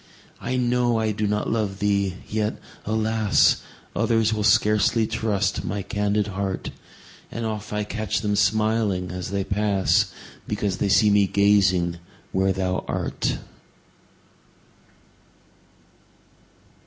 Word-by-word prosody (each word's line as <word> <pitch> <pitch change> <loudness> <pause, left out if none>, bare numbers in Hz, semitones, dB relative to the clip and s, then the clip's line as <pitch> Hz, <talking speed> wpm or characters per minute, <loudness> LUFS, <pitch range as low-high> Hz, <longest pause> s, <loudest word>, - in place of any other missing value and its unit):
I 125 +2 -2
know 120 -1 +2
I 110 -1 +1
do 105 0 -1
not 105 0 -1
love 105 -4 -1
thee! 100 -2 0
yet, 105 0 -1 0.3
alas! 110 -1 +2 0.3
Others 115 -1 +2
will 105 - -1
scarcely 105 +2 +3
trust 105 -4 -1
my 100 +2 -3
candid 105 0 0
heart; 95 -1 -3 0.6
And 115 0 -4
oft 110 -1 -4
I 105 0 -1
catch 105 -1 -2
them 105 -1 0
smiling 105 -3 +1
as 90 -1 -5
they 100 0 -1
pass, 100 -1 +1 0.4
Because 105 -3 -1
they 100 - 0
see 105 +2 +5
me 100 -1 +4
gazing 95 -4 +3 0.3
where 95 0 +2
thou 95 -1 -1
art. - - -2
105 Hz, 115 wpm, -24 LUFS, 100-110 Hz, 0.6 s, see